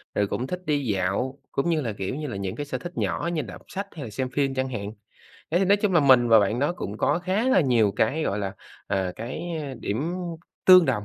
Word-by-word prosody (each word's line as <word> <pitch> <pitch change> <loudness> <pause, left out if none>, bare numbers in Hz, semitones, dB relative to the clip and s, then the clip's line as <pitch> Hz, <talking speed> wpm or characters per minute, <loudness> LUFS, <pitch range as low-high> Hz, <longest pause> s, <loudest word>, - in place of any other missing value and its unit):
rồi 100 - +2
cũng 125 +5 -3
thích 180 +3 -5
đi 145 -3 0
dạo, 105 +6 -1
cũng 140 +5 0
như 160 -2 +2
là, 115 -6 -3
kiểu 95 +4 -4
như 150 +1 -4
là, 120 - -5
những 95 -1 -3
cái 145 - -4
sở 135 -2 -3
thích 175 +7 -8
nhỏ 170 - -1
như 160 - 0
đọc 100 -9 -9
sách 200 +1 -5
hay 150 - -6
là 120 - -6
xem 130 +5 -3
phim 135 0 0
chẳng 130 0 -1
hạn, 105 -4 -5 0.6
thế 170 - +3
thì 195 - +3
nói 200 +2 +5
chung 205 -1 0
là 175 - +5
mình 130 -4 +6
và 115 -1 +8
bạn 105 +3 +1
đó 145 +5 +1
cũng 105 - -6
có 145 +4 +2
khá 190 +7 0
là 260 - +5
nhiều 120 - +3
cái, 140 +9 +1
gọi 100 - -1
là, 100 -2 -2 0.3
à, 95 -2 -1
cái 120 +8 -5 0.4
điểm 140 +12 -2 0.5
tương 185 -1 +9
đồng, 120 -8 0
130 Hz, 255 wpm, -25 LUFS, 105-165 Hz, 0.6 s, tương